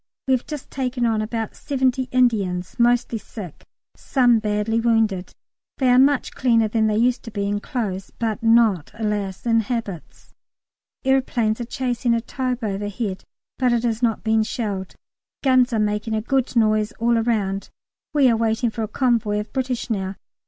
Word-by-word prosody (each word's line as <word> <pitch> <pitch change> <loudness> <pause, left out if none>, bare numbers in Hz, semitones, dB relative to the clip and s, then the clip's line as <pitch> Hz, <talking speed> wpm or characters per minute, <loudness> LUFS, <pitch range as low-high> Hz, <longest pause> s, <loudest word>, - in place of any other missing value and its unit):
We 265 - +3
have 255 - 0
just 300 -4 -7
taken 255 -2 -1
on 220 -2 +1
about 225 0 -3
seventy 260 -2 0
Indians, 200 -8 +1
mostly 240 -1 +2
sick, 195 -7 -10 0.3
some 245 -4 +3
badly 210 +1 0
wounded. 225 -5 +1 0.5
They 260 -2 +3
are 250 - +6
much 275 0 +3
cleaner 230 -4 +3
than 220 0 +1
they 215 -1 +1
used 245 +2 +2
to - - -6
be, 200 -2 -3
in 205 0 -1
clothes, 200 -5 -4
but 225 0 -2
not, 225 -7 +3
alas! 210 -3 -3
in 230 -1 +3
habits. 225 -6 -5 0.7
Aeroplanes 245 -4 +1
are - - -3
chasing 245 -1 0
a - - +1
Taube 255 0 -3
overhead, 205 0 -3 0.4
but 250 -2 +3
it 240 0 +1
is 230 0 -1
not 230 -3 0
being 220 -1 +2
shelled. 205 -4 -3 0.5
Guns 255 -2 +4
are 230 - 0
making 210 +1 0
a 215 - 0
good 265 +1 0
noise 215 -1 +2
all 235 +1 +1
round. 200 -4 -1 0.4
We 285 -3 +4
are 235 - +4
waiting 225 +1 0
for 225 - -5
a 220 - -1
convoy 220 -3 +1
of 210 - -7
British 255 -2 -2
now. 195 -2 -2
225 Hz, 170 wpm, -22 LUFS, 210-245 Hz, 0.7 s, are